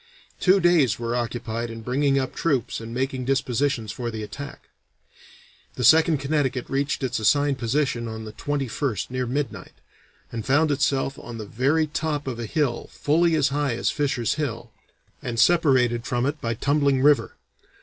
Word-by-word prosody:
Two 195 +1 +4
days 170 - +3
were 115 0 -2
occupied 120 -1 -3
in 115 0 -7
bringing 135 +3 +1
up 130 -1 -1
troops 135 -9 -1
and 115 0 -8
making 130 +1 -2
dispositions 130 -3 0
for 120 +1 -4
the 110 -1 -5
attack. 140 +6 -8 1.1
The 125 - -3
Second 160 +5 +6
Connecticut 135 -3 -1
reached 140 +1 -1
its 125 -2 -1
assigned 145 +4 +2
position 120 -1 0
on 110 0 -6
the 110 - -7
21st 135 -4 -2
near 130 -1 -2
midnight, 135 +1 -4 0.6
and 115 -2 -4
found 145 +5 +3
itself 135 -1 0
"on 120 -1 -8
the 110 - -6
very 140 +9 +1
top 150 -1 -2
of 125 -3 -4
a 115 - -4
hill 145 -3 -1
fully 165 +3 +2
as 150 -2 +2
high 140 -3 0
as - - 0
Fisher's 140 -6 0
Hill, 120 -4 -4 0.5
and 120 -2 -3
separated 130 -9 +3
from 120 0 0
it 145 +2 -2
by 115 0 -1
Tumbling 140 +1 +2
River. 145 0 +3
135 Hz, 165 wpm, -24 LUFS, 120-145 Hz, 1.1 s, Second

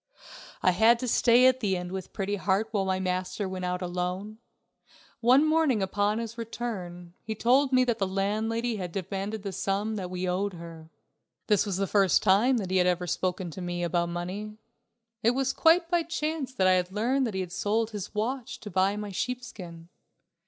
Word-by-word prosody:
I 185 - +5
had 225 +5 +5
to 250 +1 -4
stay 240 +1 +5
at 260 0 +5
the 200 -6 0
inn 180 0 -5
with 190 -1 -6
Pretty 205 0 -2
Heart 200 +3 0
while 200 -3 0
my 190 0 0
master 185 +2 -2
went 185 -1 -4
out 180 0 -2
alone. 180 +4 -4 0.8
One 255 +6 +5
morning 310 -9 +2
upon 205 +2 0
his 230 0 -5
return 185 -7 -6
he 220 0 -5
told 260 +5 +3
me 255 -1 +5
that 240 -2 -1
the 195 - +1
landlady 220 +4 -1
had 180 -3 -5
demanded 195 +3 -4
the 200 - -4
sum 200 +4 -2
that 185 -3 -4
we 185 0 -3
owed 190 +2 -1
her. 165 -2 -10 0.6
This 210 -1 +2
was 190 -3 -1
the 195 - 0
first 195 0 +3
time 215 +6 +4
that 190 -5 -3
he 190 - +2
had 180 0 +3
ever 180 0 +1
spoken 180 0 -2
to 185 - -8
me 175 0 -3
about 170 0 0
money. 190 +5 -5 0.6
It 235 +2 +3
was 270 0 0
quite 335 +1 +4
by 345 -1 +3
chance 315 -4 -3
that 220 -8 0
I 185 - +6
had 180 0 0
learned 245 +6 +1
that 215 - -5
he 190 - -1
had 180 -2 -6
sold 220 +4 0
his 205 -1 -6
watch 240 +3 -3
to 210 -2 -8
buy 190 +2 +2
my 210 -1 -5
sheepskin. 185 -8 -5
200 Hz, 200 wpm, -28 LUFS, 185-230 Hz, 0.8 s, I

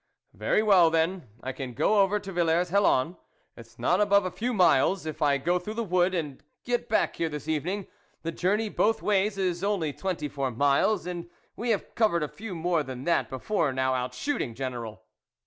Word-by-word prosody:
"Very 215 - +1
well, 190 -6 +6
then, 165 0 0 0.2
I 130 - -3
can 130 -2 -7
go 205 +9 +3
over 200 +2 +2
to 195 -1 -8
Villers 175 0 +1
Hellon, 175 -4 +2 0.4
it's 115 0 -14
not 180 +7 +2
above 200 -1 +4
a 185 - -2
few 230 +8 -2
miles, 180 - +3
if 155 -2 -6
I 145 -2 +3
go 175 +6 0
through 210 +5 -6
the 230 - -1
wood 185 -1 +1
and 150 -6 -4 0.2
get 245 -1 -2
back - - +1
here 165 - 0
this 150 0 -7
evening; 175 +6 -2 0.4
the 165 - -2
journey 200 +6 0
both 220 +1 +1
ways 200 0 +1
is 180 -2 -1
only 190 -8 0
twenty 180 -4 -3
four 140 -1 -2
miles, 145 - +2
and 175 -1 -5 0.3
we 235 +2 -3
have 215 -4 -1
covered 190 -8 +2
a - - -1
few 200 +4 -8
more 170 0 +1
than 130 -3 -7
that 170 - +1
before 150 +3 -1
now 130 0 0
out 125 0 -3
shooting, 210 - -2
General." 120 -4 -5
175 Hz, 200 wpm, -27 LUFS, 145-200 Hz, 0.4 s, well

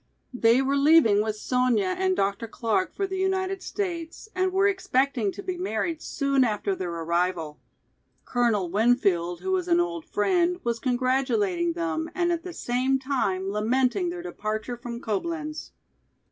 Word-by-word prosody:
They 245 +1 +4
were 275 +1 +1
leaving 280 -8 +5
with 215 0 -2
Sonya 235 -4 +1
and 375 0 +1
Dr. 200 - -1
Clark 230 - -1
for 395 - 0
the 380 -1 -4
United 380 0 0
States 345 0 -5
and 370 0 +1
were 385 +2 +3
expecting 270 - +1
to - - -8
be 365 -1 -4
married 330 0 -2
soon 275 -2 +1
after 210 -4 0
their 185 -1 -4
arrival. 170 -1 -1 0.7
Colonel 220 -8 +1
Winfield, 200 -6 +2
who 380 - -2
was 365 -1 0
an 345 0 +4
old 345 -2 -2
friend, 350 - +1
was 235 -1 -1
congratulating 245 -9 +1
them 165 -1 -2
and 345 -1 +1
at 340 -1 -1
the 360 +1 -7
same 260 -3 0
time 245 -9 -1
lamenting 255 - +1
their 345 0 -6
departure 215 -7 -4
from 240 0 -7
Coblenz. 305 - -3
255 Hz, 155 wpm, -26 LUFS, 210-345 Hz, 0.7 s, leaving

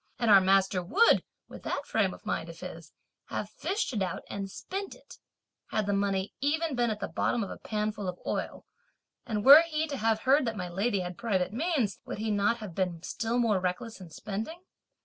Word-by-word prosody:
And 235 -3 +2
our 195 -1 +9
master 190 0 +3
would, 320 - +4 0.2
with - - -11
that - - -3
frame - - +1
of - - -12
mind - - -2
of - - -10
his, - - -9 0.3
have - - -4
fished 400 -7 -2
it 210 - -1
out 185 -2 -2
and 195 -1 -4
spent 390 - -6
it, - - -16 0.5
had 215 - -1
the 200 - 0
money 195 -1 0
even 315 +2 +1
been 240 -1 +2
at 215 -1 -3
the - - -3
bottom 235 - 0
of 195 - -6
a - - -8
pan 215 0 -1
full 210 -3 -6
of 180 - -6
oil! - - -3 0.6
and 210 -2 -2
were 285 +4 +11
he 315 -2 -1
to 290 -3 -4
have 220 -1 +1
heard 270 +1 +4
that 225 -2 -2
my 180 -2 -4
lady 200 +3 0
had 180 -1 -6
private 195 -5 0
means, 270 - 0
would - - -6
he 220 +1 -2
not 205 +3 +2
have 210 -6 -8
been 180 -2 -2
still 230 +5 -2
more 225 -5 +3
reckless 195 +4 -3
in 180 - -10
spending? 220 - -6
215 Hz, 215 wpm, -29 LUFS, 195-245 Hz, 0.6 s, were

